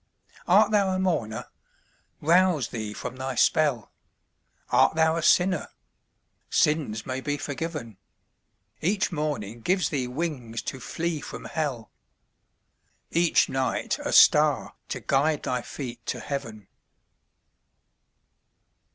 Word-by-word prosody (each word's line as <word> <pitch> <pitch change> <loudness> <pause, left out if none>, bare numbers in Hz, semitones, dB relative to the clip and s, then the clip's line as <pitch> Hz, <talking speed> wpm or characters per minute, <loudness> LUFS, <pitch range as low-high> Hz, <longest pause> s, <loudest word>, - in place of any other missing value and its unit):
Art 205 +4 +5
thou 200 -2 +3
a 185 - 0
mourner? 160 - -1 0.8
Rouse 170 -4 +3
thee 110 -2 -5
from 125 - -7
thy 130 0 -4
spell; 135 -3 +2 0.8
Art - - +4
thou 160 0 +3
a 165 - -1
sinner? 180 +1 +3 0.8
Sins 145 -9 +1
may 130 +1 -3
be 145 +1 -2
forgiven; 145 - -5 0.8
Each 190 +4 +1
morning 130 - -3
gives 185 - +1
thee 135 -4 -2
wings 125 -5 -4
to 135 - -5
flee 165 +4 -3
from - - -8
hell, 140 -8 -3 1.2
Each 170 0 +3
night 130 -2 -1
a - - -2
star - - +5 0.2
to - - -4
guide 145 +2 +1
thy 125 -1 -1
feet 120 -2 -7
to - - -2
heaven. 110 -8 -6
145 Hz, 115 wpm, -26 LUFS, 120-170 Hz, 1.2 s, Art